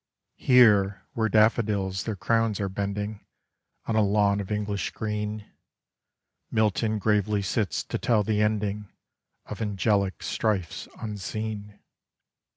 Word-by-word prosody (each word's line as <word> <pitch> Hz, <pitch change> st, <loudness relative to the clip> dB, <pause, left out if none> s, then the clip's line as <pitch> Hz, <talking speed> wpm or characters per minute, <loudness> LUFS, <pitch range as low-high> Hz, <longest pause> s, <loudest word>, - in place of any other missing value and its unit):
Here 105 Hz, -6 st, +5 dB
where 110 Hz, -1 st, 0 dB
daffodils 105 Hz, -3 st, +2 dB
their 110 Hz, -, -2 dB
crowns 115 Hz, +2 st, +1 dB
are 100 Hz, -, -1 dB
bending 100 Hz, +2 st, -4 dB, 0.6 s
On 110 Hz, -, -1 dB
a 110 Hz, -, +4 dB
lawn 100 Hz, 0 st, +2 dB
of 100 Hz, 0 st, -5 dB
English 105 Hz, -1 st, -2 dB
green, 105 Hz, -1 st, -4 dB, 1.0 s
Milton 110 Hz, 0 st, +1 dB
gravely 105 Hz, 0 st, +1 dB
sits 100 Hz, +2 st, -1 dB
to -, -, -4 dB
tell 110 Hz, -3 st, +2 dB
the 105 Hz, 0 st, 0 dB
ending 105 Hz, -1 st, -1 dB, 0.5 s
Of -, -, -7 dB
angelic 100 Hz, -2 st, 0 dB
strifes 100 Hz, -7 st, -2 dB
unseen. 105 Hz, -1 st, -5 dB
105 Hz, 115 wpm, -26 LUFS, 100-110 Hz, 1.0 s, Here